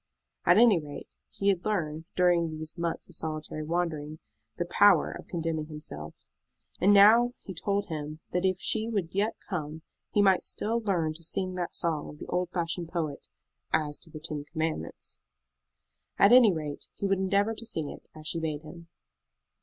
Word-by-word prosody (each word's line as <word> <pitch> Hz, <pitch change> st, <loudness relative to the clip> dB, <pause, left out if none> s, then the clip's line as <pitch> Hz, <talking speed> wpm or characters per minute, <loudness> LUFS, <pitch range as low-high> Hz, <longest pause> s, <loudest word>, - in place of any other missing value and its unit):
At -, -, +7 dB
any 225 Hz, -5 st, +6 dB
rate, 145 Hz, -1 st, -9 dB, 0.2 s
he 200 Hz, -, 0 dB
had 185 Hz, -3 st, +1 dB
learned, 160 Hz, -7 st, -2 dB
during 170 Hz, -3 st, +2 dB
those 155 Hz, 0 st, -6 dB
months 170 Hz, -1 st, -3 dB
of 180 Hz, -, -16 dB
solitary 155 Hz, -1 st, -4 dB
wandering, 155 Hz, -2 st, -2 dB, 0.4 s
the 175 Hz, -, -1 dB
power 180 Hz, 0 st, +5 dB
of -, -, -9 dB
condemning 165 Hz, -3 st, -2 dB
himself. 150 Hz, -, -8 dB, 0.5 s
And 195 Hz, -, +5 dB
now 225 Hz, +5 st, +7 dB
he 190 Hz, -, -7 dB
told 200 Hz, +4 st, -1 dB
him 155 Hz, -1 st, -5 dB
that 180 Hz, +1 st, 0 dB
if 185 Hz, -1 st, +2 dB
she 220 Hz, +3 st, +1 dB
would 195 Hz, -7 st, -2 dB
yet 205 Hz, +3 st, 0 dB
come 160 Hz, -4 st, -4 dB, 0.3 s
he 205 Hz, -, +3 dB
might 190 Hz, -2 st, +5 dB
still 230 Hz, +2 st, 0 dB
learn 170 Hz, -7 st, 0 dB
to 165 Hz, +2 st, -11 dB
sing 185 Hz, +3 st, -1 dB
that 180 Hz, -1 st, -4 dB
song 160 Hz, -3 st, 0 dB
of 150 Hz, -, -11 dB
the -, -, -8 dB
old 180 Hz, -1 st, -1 dB
fashioned 170 Hz, -1 st, -2 dB
poet 160 Hz, -4 st, -3 dB, 0.4 s
"as 150 Hz, -2 st, 0 dB
to 170 Hz, -, -9 dB
the 155 Hz, -, -9 dB
ten 150 Hz, -2 st, -5 dB
commandments." 160 Hz, -, -4 dB, 1.0 s
At 200 Hz, -, +6 dB
any 245 Hz, -4 st, +8 dB
rate, 155 Hz, -4 st, -5 dB
he -, -, -3 dB
would 195 Hz, -1 st, +2 dB
endeavor 200 Hz, +3 st, +2 dB
to 230 Hz, -, -9 dB
sing 160 Hz, -9 st, -3 dB
it, -, -, -12 dB
as 155 Hz, 0 st, -11 dB
she 165 Hz, -, 0 dB
bade 155 Hz, -2 st, -3 dB
him. 165 Hz, +2 st, -11 dB
170 Hz, 180 wpm, -28 LUFS, 155-195 Hz, 1.0 s, any